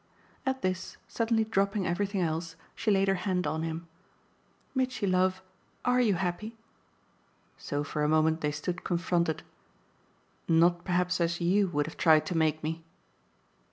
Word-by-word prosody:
At 265 0 -1
this, 185 0 -2
suddenly 230 -1 +1
dropping 200 -2 0
everything 195 +2 -1
else, 165 0 -2 0.2
she 230 - -2
laid 195 -1 +3
her 195 - +4
hand 185 -1 0
on 160 +1 -1
him. 165 +1 -4 0.9
"Mitchy 255 -5 0
love, 185 0 +1 0.4
ARE 250 0 +4
you 215 -5 +3
happy?" 190 +6 -3 1.0
So 145 0 -3
for 150 0 -2
a 150 - +2
moment 155 +1 +3
they 150 - +1
stood 175 +5 -4
confronted. 170 -2 0 1.0
"Not 170 +1 +4
perhaps 180 0 0
as 170 0 0
YOU 190 +3 +3
would 145 -4 0
have 160 - -8
tried 155 -2 +5
to 180 - -3
make 155 -1 +1
me." 160 +1 -3
180 Hz, 150 wpm, -29 LUFS, 160-195 Hz, 1.0 s, tried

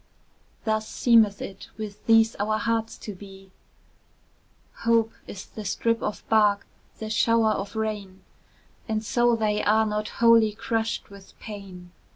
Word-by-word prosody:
Thus 215 -1 0
seemeth 225 -4 +3
it 195 - -9
with 215 -2 -7
these 225 0 +5
our 215 +1 0
hearts 225 +1 -1
to 210 - -7
be; 195 0 -13 1.3
Hope 230 -1 +2 0.2
is 190 - -8
the 215 - -9
strip 230 +3 0
of 210 - -4
bark, 210 -2 +3 0.3
the 220 - -6
shower 225 0 +3
of 200 0 -4
rain, 210 -4 -4 0.7
And 220 0 -1
so 240 +1 +3
they 210 -2 0
are 220 +1 +3
not 210 0 -2
wholly 230 -2 +5
crushed 225 0 -2
with 200 -1 -15
pain. 195 -5 -10
215 Hz, 140 wpm, -25 LUFS, 205-225 Hz, 1.3 s, these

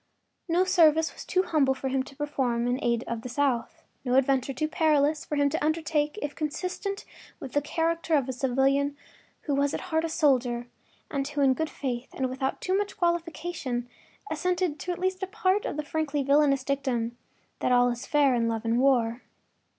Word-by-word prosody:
No 345 +2 +3
service 320 -4 +4
was - - -9
too 370 0 +1
humble 295 -7 +2
for 265 - -4
him 265 0 +1
to 275 +1 -10
perform 260 -5 -1
in 245 +1 +1
the - - -8
aid 235 0 +1
of 235 -1 -3
the 250 - -7
South, 250 -3 -1 0.2
no 250 -1 +1
adventure 270 0 +2
too 270 +4 -1
perilous 305 -1 +2
for 300 - -3
him 285 -1 +3
to 315 - -1
undertake 310 0 0
if 290 0 -3
consistent 365 +6 -4 0.3
with 260 - -7
the 290 - +2
character 330 +2 0
of 275 -3 +1
a 260 - -2
civilian 270 +3 +1 0.4
who 290 - -2
was 280 +1 +1
at - - -3
heart 320 0 +3
a 330 - -1
soldier, 250 -6 +2 0.5
and 275 -2 -1
who 295 0 -2
in 270 -1 +5
good 320 +3 -2
faith 250 -2 -4
and 260 -1 -1
without 265 +1 -2
too 375 - 0
much 405 0 -2
qualification 335 -7 -2 0.4
assented 350 -1 0
to 360 - -3
at 350 - -3
least 370 +1 -1
a 380 - -2
part 405 -1 +1
of - - -3
the 300 - -2
frankly 295 -2 -1
villainous 280 -1 +3
dictum 260 -4 -1 0.4
that - - 0
all 245 0 +5
is 240 +1 -6
fair 285 -3 +4
in 235 -1 +1
love 225 0 -2
and 230 +1 +2
war. 245 -3 +2
285 Hz, 200 wpm, -27 LUFS, 255-320 Hz, 0.5 s, in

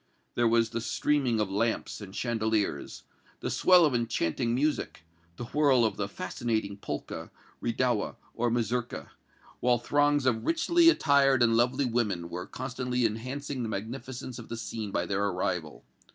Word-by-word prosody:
There 120 0 +2
was 115 0 +3
the 115 - -2
streaming 130 -1 +1
of 105 -2 0
lamps 110 +2 -1
and 100 -1 -9
chandeliers, 110 - -1 0.4
the - - -3
swell 180 -2 +6
of 145 - +1
enchanting 115 -1 0
music, 145 - -1 0.3
the - - -5
whirl 135 -2 +3
of 110 - 0
the 100 - -2
fascinating 100 +1 -3
polka, - - -5 0.3
redowa 120 -2 0 0.2
or 120 +1 0
mazurka, 120 +1 -2 0.5
while 125 -1 +3
throngs 145 +3 +2
of 115 -4 +1
richly 335 +1 +4
attired 140 - +4
and 115 -1 +4
lovely 125 +4 +2
women 105 -8 -1
were 90 +1 -5
constantly 125 -1 -2
enhancing 130 +5 -3
the 115 - -2
magnificence 120 +4 -6
of 115 - -10
the 115 - -4
scene 110 -2 -5
by 90 - -1
their 100 +2 -1
arrival. 90 -9 -2
120 Hz, 150 wpm, -29 LUFS, 110-130 Hz, 0.5 s, swell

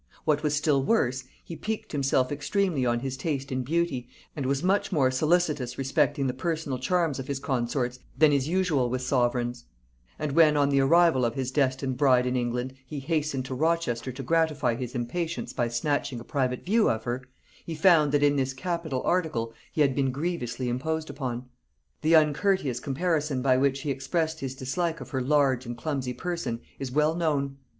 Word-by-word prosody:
What 150 -2 +2
was 150 -1 +1
still 145 -2 +2
worse, 130 - +1 0.2
he 170 - -8
piqued 220 +3 -4
himself 135 -2 +1
extremely 145 -1 0
on 120 0 +1
his 135 0 -3
taste 135 0 -3
in 130 0 -1
beauty, 145 -3 -1 0.3
and 140 -4 -2
was 140 +2 0
much 195 +2 +1
more 135 -7 +3
solicitous 150 -3 +1
respecting 140 +1 +1
the 130 - 0
personal 150 -2 -2
charms 160 +1 0
of 135 - -6
his 140 -2 -2
consorts 125 -1 -2 0.2
than 150 0 +5
is 140 -1 +1
usual 165 -8 +1
with 130 +1 -2
sovereigns; 120 - 0 0.5
and 150 -2 -2
when, 155 0 +5
on 140 -1 +3
the 140 -1 +3
arrival 160 -1 +4
of 115 -1 0
his 130 -1 -2
destined 130 -2 0
bride 130 -2 +4
in 125 0 0
England, 125 +1 -2
he 150 - -6
hastened 145 -2 -1
to 130 - -5
Rochester 130 -5 0
to 135 +2 -7
gratify 155 -4 +1
his 125 +1 -5
impatience 160 +8 -3
by 120 - 0
snatching 125 +1 -1
a - - -9
private 130 -1 -2
view 220 +4 +3
of 110 0 -1
her, 120 +1 -2 0.4
he 165 - -5
found 155 -3 +5
that 145 0 +2
in 145 0 +4
this 130 -1 0
capital 160 -3 -3
article 155 -11 0 0.2
he 155 - 0
had 140 -2 +4
been 135 0 +1
grievously 135 -4 -3
imposed 160 +6 -2
upon. 125 -3 -4 0.6
The 160 +2 +4
uncourteous 155 - +2
comparison 145 -1 -1
by 130 -1 +4
which 135 +1 +1
he 150 - -2
expressed 160 +4 -1
his 135 -1 -4
dislike 165 +6 -2
of - - -9
her 130 -2 -1
large 135 -2 +2
and 120 0 -5
clumsy 130 -2 -2
person 170 -8 -3 0.2
is 135 -2 -4
well 150 +3 +2
known. 145 -5 -1
140 Hz, 190 wpm, -27 LUFS, 130-160 Hz, 0.6 s, than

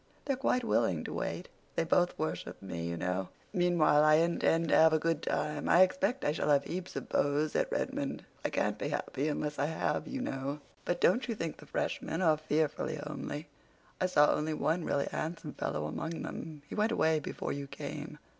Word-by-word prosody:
They're 275 - +1
quite 255 -1 +1
willing 110 - +1
to - - -5
wait. - - -3 0.3
They - - +2
both 175 +2 +2
worship 155 - -3
me, 85 -3 -5
you 85 0 -3
know. 90 +2 -1 0.2
Meanwhile, 175 -5 +4
I 155 0 +7
intend 165 0 +2
to - - +5
have 160 0 +7
a - - +5
good 165 +1 0
time. 150 -1 -1
I 180 - +8
expect 195 +7 0
I - - +3
shall 150 - -1
have 140 -1 +5
heaps 185 +3 -5
of - - -4
beaux 145 +2 +2
at - - +1
Redmond. - - -2 0.2
I - - +1
can't - - 0
be - - -2
happy 140 +3 -2
unless 150 -1 -2
I 145 - +2
have, 160 - -1
you 270 - -4
know. 140 - -3 0.3
But 175 0 -1
don't 240 +10 +4
you 230 - -1
think 165 -6 -4
the - - -14
freshmen 165 - -2
are 160 -4 +4
fearfully 155 0 0
homely? 150 0 -5 0.5
I 185 - +3
saw 150 -5 +5
only 155 +1 -1
one 160 +4 0
really 140 - 0
handsome 155 -2 -4
fellow 75 +1 -2
among 160 - -4
them. 155 -3 -7
He - - -8
went 215 +2 +2
away 160 -8 +3
before 150 - -4
you 140 0 -4
came. - - -6
155 Hz, 200 wpm, -32 LUFS, 145-175 Hz, 0.5 s, I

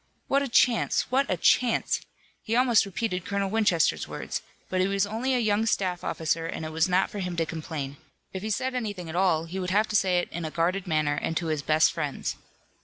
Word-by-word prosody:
What 275 +1 +2
a 280 - -1
chance! 240 0 +2
What 275 +2 +2
a 185 - +1
chance! 240 +7 +2 0.4
He 225 - -2
almost 240 -5 +4
repeated 190 -2 -2
Colonel 200 0 -2
Winchester's 205 -7 +2
words, - - -4 0.3
but 185 0 0
he 185 - +2
was 195 0 +1
only 235 +5 -1
a - - +3
young 220 -1 +1
staff 185 -4 0
officer 165 0 -1
and 160 - -5
it 155 - -5
was 160 +3 +1
not 185 +1 +2
for 205 - -5
him 180 -2 -3
to 165 -1 0
complain. 150 -4 -5 0.4
If 190 - -4
he 215 - -4
said 255 +4 -1
anything 205 -8 -4
at 160 - -6
all 175 -3 +2
he 180 +3 -5
would 180 -1 -2
have 210 +3 +2
to 215 - -2
say 185 -3 +3
it 175 - -1
in 170 - -4
a 160 - -3
guarded 180 +4 -1
manner 155 -3 +1
and 165 - -1
to 175 - -2
his 150 - -2
best 155 +2 +3
friends. 150 -4 -3
185 Hz, 230 wpm, -27 LUFS, 165-215 Hz, 0.4 s, almost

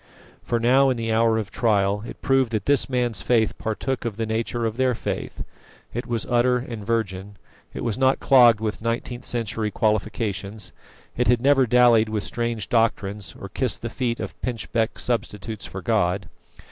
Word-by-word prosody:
For 120 - -1
now, 130 +4 +4
in 130 - 0
the 115 -1 -2
hour 115 0 +3
of 105 -3 -4
trial, 100 -3 +1
it - - -10
proved 135 -3 +2
that 105 -3 -1
this 145 -1 +2
man's 125 -3 0
faith 115 -3 +2
partook 120 +4 -2
of 115 -3 -4
the 115 - -1
nature 115 +1 -2
of 110 0 -2
their 130 -2 +2
faith. - - -4 0.5
It 120 +1 -4
was 115 -3 -2
utter 125 +1 +3
and 120 -3 -6
virgin; 100 -3 -2 0.4
it - - -6
was 115 0 -2
not 130 0 +3
clogged 120 -5 +6
with 110 -1 -3
nineteenth 120 +2 -3
century 115 -2 -2
qualifications; 105 -2 -2 0.4
it 125 - 0
had 120 0 +4
never 135 0 +4
dallied 120 -2 +5
with 110 -1 -2
strange 115 -2 -3
doctrines, 105 -3 0
or - - -7
kissed - - -2
the - - -2
feet 120 -2 -2
of - - -5
pinchbeck 115 -1 -2
substitutes 110 -3 -3
for 95 -1 -8
God. 100 -5 +1
115 Hz, 175 wpm, -23 LUFS, 105-120 Hz, 0.5 s, clogged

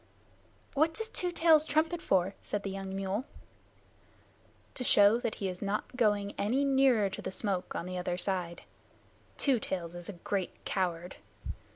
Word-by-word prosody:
"What 315 +3 +2
does 445 0 -4
Two 360 -4 -2
Tails 325 -3 +5
trumpet 320 +3 +1
for?" 190 0 +2
said 205 -1 -3
the 195 - -3
young 195 0 -5
mule. 195 +4 -1 1.5
"To 250 - -2
show 205 -1 +6
that 235 -3 -2
he 195 - -3
is 180 -1 -5
not 205 +5 -2
going 205 -4 +2
any 250 +8 +2
nearer 265 -6 +4
to - - -6
the - - -4
smoke 190 -2 -2
on - - -3
the 180 0 -4
other 180 0 -2
side. 180 -2 -2 0.7
Two 270 -5 +3
Tails 175 -5 -4
is 175 +1 -5
a - - -4
great 185 +2 -4
coward. 180 -2 -2
200 Hz, 165 wpm, -31 LUFS, 185-265 Hz, 1.5 s, show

